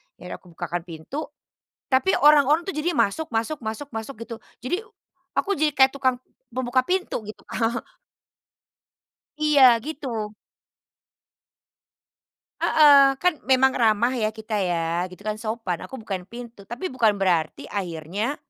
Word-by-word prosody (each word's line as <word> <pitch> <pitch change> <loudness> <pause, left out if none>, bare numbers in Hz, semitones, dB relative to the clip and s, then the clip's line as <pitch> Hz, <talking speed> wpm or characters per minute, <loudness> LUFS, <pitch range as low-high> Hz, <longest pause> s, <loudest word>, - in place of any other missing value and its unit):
ya 180 - -11
udah - - -5
aku - - -22
bukakan 175 0 -3
pintu 170 - -6 0.6
tapi 265 +9 +3
orang-orang 300 +4 +5
tuh - - -3
jadinya 305 -8 +2
masuk, 315 +10 -6
masuk, 230 +7 -1
masuk, 220 +6 -5
masuk 225 +5 -5
gitu 230 0 -7 0.2
jadi 355 - -3 0.5
aku 400 0 0
jadi 300 0 +1
kayak 265 -1 +6
tukang 260 -2 0 0.3
pembuka 255 +1 0
pintu 365 - -2
gitu 215 +1 -10
Kak. 235 +2 -1 1.6
Iya, 275 -6 +6
gitu. 245 -9 -5 2.3
Heeh, 280 -3 +6
kan 360 -5 +2
memang 265 0 +5
ramah 230 +1 +2
ya 220 -4 -1
kita 220 -1 -3
ya, 175 -1 -1
gitu 185 +2 -14
kan 215 0 -3
sopan 220 -5 -3
aku 265 - -8
bukain 190 -3 -5
pintu, 235 -3 -11
tapi 240 - -5
bukan 225 -5 +2
berarti 175 -5 0
akhirnya 190 - -3
235 Hz, 135 wpm, -24 LUFS, 205-280 Hz, 2.3 s, kayak